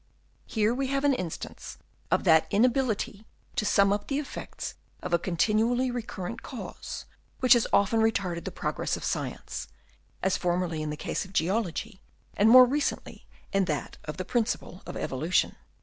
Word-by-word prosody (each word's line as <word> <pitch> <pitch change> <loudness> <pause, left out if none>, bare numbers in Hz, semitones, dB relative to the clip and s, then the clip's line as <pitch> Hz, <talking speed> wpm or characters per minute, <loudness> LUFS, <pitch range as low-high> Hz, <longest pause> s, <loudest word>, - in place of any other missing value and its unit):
Here 220 0 +2
we 265 +2 -1
have 275 +1 0
an 285 -1 +4
instance 180 -10 -5 0.3
of - - +2
that 160 0 +5
inability 225 -2 +1 0.3
to 210 - 0
sum 200 -1 +4
up 205 - -3
the 275 - -1
effects 290 -1 -5 0.3
of - - -3
a 170 - +5
continually 220 +9 +1
recurrent 230 -3 -5
cause, 255 - -7 0.3
which 255 -2 +7
has 240 -2 +3
often 200 +3 +3
retarded 185 -6 0
the - - -3
progress - - -2
of - - -9
science, - - -3 0.6
as 190 0 +2
formerly 175 -3 -1
in 155 - -3
the 150 - -4
case - - -2
of 190 0 -13
geology, 195 +2 -1 0.3
and 210 +2 +5
more 255 +2 +10
recently 285 +3 -2 0.3
in 195 -1 +3
that 150 -5 -3
of 150 - -6
the 185 - -3
principle 215 -5 -1
of - - -5
evolution. 155 +7 0
210 Hz, 165 wpm, -28 LUFS, 180-245 Hz, 0.6 s, more